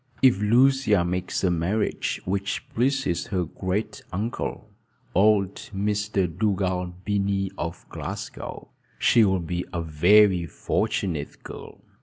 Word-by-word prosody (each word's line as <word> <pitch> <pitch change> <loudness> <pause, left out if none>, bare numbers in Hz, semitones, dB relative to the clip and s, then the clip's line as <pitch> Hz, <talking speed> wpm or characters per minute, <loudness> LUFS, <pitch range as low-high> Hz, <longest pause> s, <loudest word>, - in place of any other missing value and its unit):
"If 125 -7 +5
Lucia 120 -3 +4
makes 90 +2 -2
a 90 - +3
marriage 90 +6 -1
which 100 +6 -2
pleases 130 -7 0
her 90 -3 -1
great 100 +6 -3
uncle, 105 +1 -4 0.4
old 100 -1 +4 0.2
Mr. 105 -1 0
Dugald 90 -1 -1
Binnie, 100 -1 0
of 85 -2 -5
Glasgow, - - -7 0.3
she 115 - +5
will 95 -2 +3
be 85 +1 -3
a 85 -2 -2
very 90 +3 +4
fortunate 90 -4 -2
girl. - - -10
95 Hz, 115 wpm, -25 LUFS, 90-105 Hz, 0.4 s, If